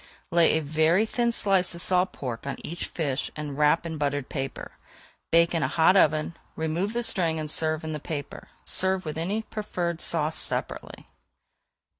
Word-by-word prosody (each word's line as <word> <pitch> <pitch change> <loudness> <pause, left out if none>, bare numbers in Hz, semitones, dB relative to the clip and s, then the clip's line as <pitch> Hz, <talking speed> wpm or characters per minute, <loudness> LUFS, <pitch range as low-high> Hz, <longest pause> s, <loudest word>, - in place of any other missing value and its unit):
Lay 170 -1 +4
a - - -1
very 160 +7 +2
thin 235 +1 0
slice 195 -5 +2
of 170 - -3
salt 185 0 +2
pork 125 -1 -6
on 135 - -3
each 170 +3 -4
fish 145 -5 -2
and 150 -2 -5
wrap 150 +3 +2
in 160 -2 -5
buttered 145 -1 -2
paper. 135 -2 -5 0.6
Bake 170 +1 +4
in 165 - 0
a - - +1
hot 165 +3 +3
oven. 155 -2 +2 0.2
Remove 165 +6 -2
the 240 0 -1
string 170 -7 +3
and 155 - -4
serve 155 +1 +2
in 160 0 -4
the 150 - -4
paper. 145 -1 -7 0.2
Serve 190 -1 +2
any 195 +7 -2
preferred 175 -6 -4
sauce 160 -1 0
separately. - - -3
160 Hz, 170 wpm, -26 LUFS, 150-180 Hz, 0.6 s, Lay